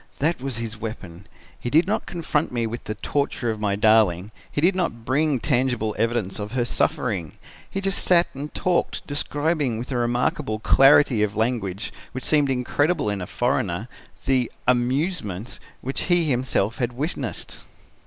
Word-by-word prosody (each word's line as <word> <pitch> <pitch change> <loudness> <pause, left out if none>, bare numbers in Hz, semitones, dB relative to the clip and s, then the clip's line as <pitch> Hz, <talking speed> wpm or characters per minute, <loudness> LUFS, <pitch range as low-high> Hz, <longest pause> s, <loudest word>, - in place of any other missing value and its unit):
"That 155 -1 0
was 135 -3 -3
his 115 -1 -4
weapon. 95 -5 -7 0.3
He 120 - -3
did 160 +7 +4
not 205 +3 -1
confront 165 -3 -1
me 120 -2 -1
with 115 +1 -5
the 110 - -3
torture 130 0 -1
of 110 - -5
my 105 -2 0
darling, 105 -3 +3 0.2
he - - -2
did 180 +5 +3
not 120 -11 -2
bring 140 +2 +2
tangible 120 -5 0
evidence 115 -4 0
of 105 +2 -5
her 125 -2 +1
suffering 120 - -1 0.4
he 195 - -3
just 195 0 +1
sat 175 -1 +5
and 145 +2 -6
talked, 180 -1 0
describing 145 -3 0
with 120 +4 -6
a 125 - 0
remarkable 120 0 0
clarity 135 0 +5
of 105 0 0
language 110 -4 -1 0.2
which 130 - -5
seemed 145 -3 +3
incredible 140 +1 +1
in 100 -2 -3
a 90 - -5
foreigner, 110 -5 -1 0.4
the 130 -3 +2 0.2
'amusements' 125 - 0 0.2
which 135 +2 -2
he 175 -1 +3
himself 120 -3 0
had 120 -1 -1
witnessed. 130 - -4
125 Hz, 165 wpm, -24 LUFS, 110-145 Hz, 0.4 s, sat